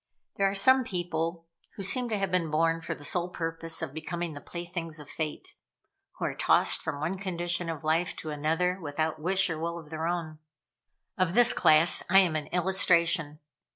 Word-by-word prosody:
There 195 0 +3
are 195 - -4
some 260 +7 +5
people 170 -4 -3 0.3
who 200 - -6
seem 245 +5 +1
to 215 - -1
have 195 -1 -2
been 180 -3 +1
born 165 +2 +1
for - - -4
the - - -12
sole 175 +4 +1
purpose 165 -1 -3
of 135 - -5
becoming 170 +1 -4
the 145 - -9
playthings 170 -2 -6
of 150 -2 -11
Fate 155 -1 -5 0.6
who - - -4
are - - -2
tossed - - +3
from 150 -3 -4
one 175 +6 -3
condition 175 -2 -2
of 160 -1 -5
life 160 +3 0
to 155 - -6
another 165 +5 0
without 155 +1 -2
wish 190 +4 +2
or 165 -3 -4
will 170 +1 -3
of 160 -2 -11
their 160 +1 -3
own. 165 -3 -3 0.8
Of 185 -1 +1
this 245 0 +6
class 155 +2 +4
I 190 - +5
am 180 -5 +4
an 155 -1 -3
illustration. 170 -4 +2
170 Hz, 190 wpm, -28 LUFS, 160-180 Hz, 0.8 s, this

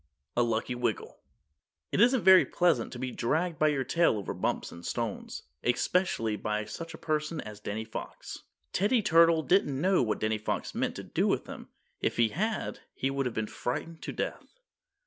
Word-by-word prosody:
A 120 - +3
LUCKY 115 +1 0
WIGGLE 120 0 -3 0.7
It - - +2
isn't 245 +1 +5
very 190 -1 +8
pleasant 175 -1 +1
to 125 - -7
be 130 0 -3
dragged 155 +7 -1
by 155 - +4
your 145 -3 +1
tail 165 -4 +2
over 100 - -4
bumps - - -2
and 85 - -11
stones, 115 0 -4 0.2
especially 120 - +1
by 105 0 -2
such 165 +10 -7
a - - -10
person 155 0 -2
as 105 -4 -7
Danny 105 +1 -4
Fox. 110 - -7 0.3
Teddy 210 +4 +2
Turtle 165 -2 +5
didn't 165 -8 +2
know 185 +4 +3
what 110 -3 0
Danny 110 0 0
Fox 110 - -3
meant - - -1
to - - -6
do - - 0
with - - +1
him. - - -9 0.3
If - - -1
he 115 -1 +4
had 215 - -2 0.2
he 135 - -1
would 135 -1 0
have 120 - -5
been 110 - 0
frightened 160 +9 -4
to - - -4
death. - - -5
135 Hz, 185 wpm, -29 LUFS, 110-170 Hz, 0.7 s, very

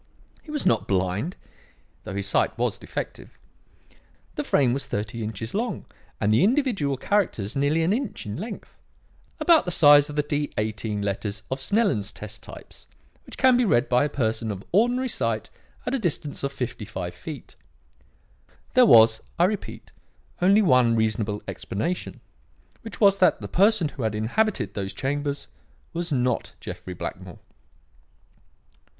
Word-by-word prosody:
He - - -17
was 300 -1 -3
not 115 - +2
blind, 95 - -1 0.7
though 95 - -6
his 100 -1 -2
sight - - +1
was - - -1
defective. - - -7 1.0
The - - -3
frame 130 -4 +2
was 140 - -4
thirty 110 +3 -3
inches 110 +1 -5
long 230 +4 -2 0.3
and 105 +1 +2
the 110 - +4
individual 210 - +1
characters 130 - 0
nearly 145 +4 +2
an 175 +5 +2
inch 255 0 -3
in 105 0 -5
length 210 +5 -8 0.6
about 335 -3 +5
the 180 - -2
size 145 -3 +7
of 150 - -7
the 150 - +1
D 145 0 -1
18 105 -1 -2
letters 100 +1 -3
of 130 - -2
Snellen's 185 - +1
test 105 0 -9
types, - - -12 0.4
which - - -9
can 260 -1 +5
be 250 - +3
read 135 - +2
by 125 +2 +3
a 150 - 0
person 115 -4 -1
of 100 -2 -5
ordinary 245 +6 +2
sight 115 - -2 0.3
at 250 - -2
a 270 - +1
distance 155 -8 -3
of 140 - -1
fifty 125 -4 -5
five 95 -4 -5
feet. 155 -3 -9 1.2
There 255 -2 +6
was, 110 - +7 0.2
I 170 - +4
repeat, 205 +3 -2 0.5
only 200 +4 +5
one 125 - +4
reasonable 110 -2 0
explanation; 170 - -4 0.6
which 225 -3 -9
was 200 -2 +5
that 185 - +4
the - - -6
person 195 -4 +3
who 135 - -9
had 110 -2 -1
inhabited 110 - 0
those 100 -1 -4
chambers 145 +1 -3 0.5
was 170 0 -4
not 125 -3 0
Jeffrey 90 - -7
Blackmore. - - -7
140 Hz, 155 wpm, -25 LUFS, -, 1.2 s, size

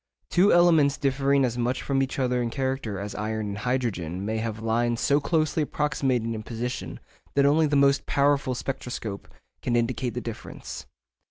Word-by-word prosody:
Two 185 +4 +5
elements 160 -5 +5
differing 140 0 +2
as 120 0 -2
much 125 +2 -1
from 135 -1 +1
each 135 - -2
other 125 -2 +1
in 120 - -1
character 130 -5 -2
as 100 +2 -5
iron 110 0 -3
and 100 - -4
hydrogen 105 -8 -2
may 110 +1 -1
have 110 -1 -3
lines 115 +1 0
so 145 0 +3
closely 155 +1 +1
approximating 135 -6 0
in 110 - -4
position 120 +3 -5 0.4
that 140 0 +4
only 155 +2 +4
the 145 - 0
most 140 0 +3
powerful 140 -2 +2
spectroscope 125 -6 -5 0.3
can 120 - 0
indicate 120 +1 0
the - - -1
difference. 115 -2 -8
125 Hz, 170 wpm, -26 LUFS, 115-140 Hz, 0.4 s, Two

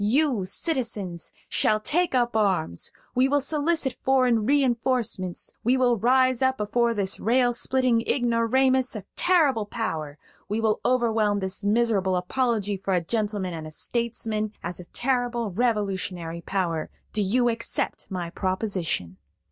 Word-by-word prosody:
You, 245 -2 +2
citizens, 205 - -2 0.2
shall 215 0 +2
take 335 +6 0
up 240 -2 +1
arms; 190 - 0 0.2
we 255 +2 +3
will 285 +1 +3
solicit 295 -1 0
foreign 250 -5 +3
re 285 +1 +4
enforcements; 235 -7 -1
we 250 +3 +3
will 250 -2 +3
rise 255 +2 +3
up 260 0 +2
before 235 +3 +1
this 195 -2 -1
rail 245 +2 +2
splitting 250 -1 +1
ignoramus 250 +1 +2
a 210 - -5
terrible 290 - +3
power; 160 -11 -4 0.3
we 210 +2 -1
will 220 -1 +1
overwhelm 225 -4 +2
this 190 +1 -3
miserable 205 -3 +2
apology 210 +1 0
for 190 0 -1
a 175 - +2
gentleman 205 -3 -1
and 160 -1 -6
a - - -7
statesman 220 +3 -2
as 175 +1 -4
a 180 - -9
terrible 240 0 -1
revolutionary 190 -6 -1
power. 170 -4 -2 0.2
Do 215 - +2
you 240 +5 +2
accept 230 -1 -2
my 175 -3 -4
proposition?" 185 - -2
225 Hz, 140 wpm, -25 LUFS, 190-255 Hz, 0.3 s, re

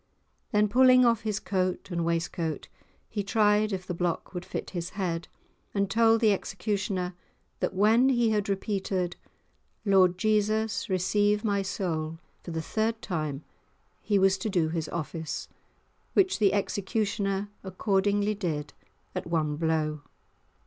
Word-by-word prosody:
Then, 210 -1 +3
pulling 255 +3 +6
off 230 -2 +3
his 215 -1 -2
coat 185 -1 -2
and 170 -1 -1
waistcoat, 165 -1 -2 0.4
he 210 - -3
tried 210 +1 +3
if 185 -2 -3
the 180 - -3
block 175 +1 -2
would 180 -1 -4
fit - - -5
his 175 -1 -4
head, 170 -3 -2 0.5
and 200 -1 +1
told 225 +1 +4
the 215 -3 +5
executioner 195 -2 -2 0.5
that - - -1
when 225 +6 +5
he 240 -3 +3
had 210 -2 0
repeated 190 -3 -1 0.7
"Lord 185 -3 +4
Jesus 215 +1 +1
receive 205 +3 +2
my 200 -2 +1
soul" 165 -4 -3 0.2
for - - -9
the 160 -1 -3
third 220 +5 -1
time, 155 -5 -3 0.6
he 205 - +1
was 195 0 +3
to 215 - -2
do 175 -5 +1
his 160 -1 -3
office, 160 -1 -4 0.7
which 380 - +3
the 205 -3 +4
executioner 200 0 -1
accordingly 200 +2 +1
did 155 -8 -3 0.4
at - - -4
one 155 -3 0
blow. 155 -1 0
195 Hz, 140 wpm, -28 LUFS, 170-210 Hz, 0.7 s, pulling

